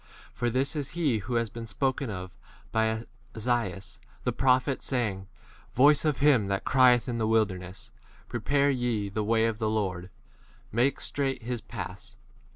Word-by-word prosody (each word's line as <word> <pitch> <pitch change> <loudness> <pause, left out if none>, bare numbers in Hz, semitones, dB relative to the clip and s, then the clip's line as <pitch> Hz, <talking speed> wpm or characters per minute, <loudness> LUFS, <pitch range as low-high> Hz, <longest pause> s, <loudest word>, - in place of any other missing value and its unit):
For 120 +1 -1
this 130 +6 0
is 145 -2 -3
he 140 -10 +2
who 115 +5 -4
has 115 -2 0
been 115 -1 -7
spoken 130 +5 -1
of 95 -1 -6 0.4
by 110 -1 +2
m 110 +1 -2 0.3
Esaias 110 -5 -2 0.2
the - - +1
prophet, 130 +1 +2
saying, 105 -7 -2 0.5
Voice 145 +4 +5
of 150 -3 +2
him 135 -8 +4
that 100 0 -2
crieth 125 -3 +5
in 120 -2 -2
the 110 - +1
wilderness: 100 -4 -1 0.4
Prepare 140 +5 +1
ye 120 -6 -1
the 105 +2 -2
way 110 +1 +2
of 115 -1 -1
[the] 110 -2 0
Lord, 95 -5 -1
n - - -15 0.6
make 125 +6 +1
straight 135 -3 -2
his 120 -1 -3
4 - - -30
paths. - - -7
115 Hz, 170 wpm, -28 LUFS, 105-130 Hz, 0.6 s, Voice